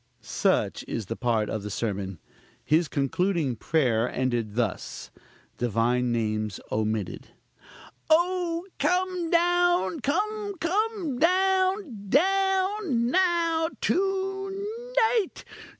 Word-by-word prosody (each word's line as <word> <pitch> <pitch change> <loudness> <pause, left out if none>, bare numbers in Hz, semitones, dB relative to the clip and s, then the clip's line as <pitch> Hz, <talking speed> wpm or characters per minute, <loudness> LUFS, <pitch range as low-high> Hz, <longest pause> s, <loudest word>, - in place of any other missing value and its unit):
Such - - 0
is 115 - -3
part 115 0 0
of 110 - -3
the 105 - -6
sermon. 100 -3 -3 0.5
His 160 +2 +3
concluding 150 0 0
prayer 125 -3 +1
ended 120 -5 -1
thus 115 -6 -3 0.5
(Divine 120 +1 +1
names 110 -3 -1
omitted). 110 -3 -2 0.8
"Oh, 345 +1 +2
come 360 -2 0
down! 350 -1 +2
come, 410 - -1
come 370 - -1
down! 370 - +1
down! 380 - +2
now! 335 -2 +2
to 390 +4 -2
night! 450 -4 +2
325 Hz, 90 wpm, -26 LUFS, -, 0.8 s, His